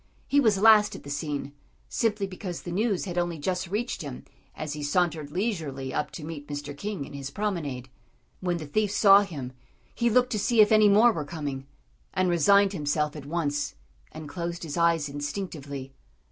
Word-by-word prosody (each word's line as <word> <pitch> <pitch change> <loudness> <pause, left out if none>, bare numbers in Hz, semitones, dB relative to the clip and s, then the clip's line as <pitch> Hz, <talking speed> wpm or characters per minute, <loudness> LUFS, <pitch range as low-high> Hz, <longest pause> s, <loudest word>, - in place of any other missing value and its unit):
He 285 - +4
was 220 -7 +4
last 215 0 +6
at - - -10
the 140 - -7
scene, 145 -1 -3 0.3
simply 210 -3 0
because 185 -2 -6
the 175 - -6
news 200 +1 0
had 175 -2 -2
only 175 -1 -1
just 180 +4 -2
reached 215 +7 -2
him 140 -5 -7 0.3
as 155 -1 -4
he 150 - -6
sauntered 155 -1 0
leisurely 155 - -3
up 150 - -1
to 160 - -7
meet 150 -2 -7
Mr. 145 -1 -5
King 195 -1 -4
in - - -12
his 140 -1 -5
promenade. 150 -9 -3 0.5
When 180 -2 -1
the 155 - -6
thief 210 +8 0
saw 200 0 +7
him, 145 -10 -6 0.4
he 235 0 +1
looked 250 +2 +3
to 215 - 0
see 230 +3 +1
if 210 0 +7
any 215 -1 +6
more 220 +4 +6
were 160 -8 -3
coming, 145 -3 -5 0.5
and 185 -1 +2
resigned 200 +4 +4
himself 150 -2 -1
at 145 -2 -8
once 145 -3 -1 0.4
and 155 -1 -8
closed 170 +2 -4
his 155 -3 -5
eyes 170 -3 +2
instinctively. 145 -2 -5
170 Hz, 190 wpm, -27 LUFS, 145-200 Hz, 0.5 s, saw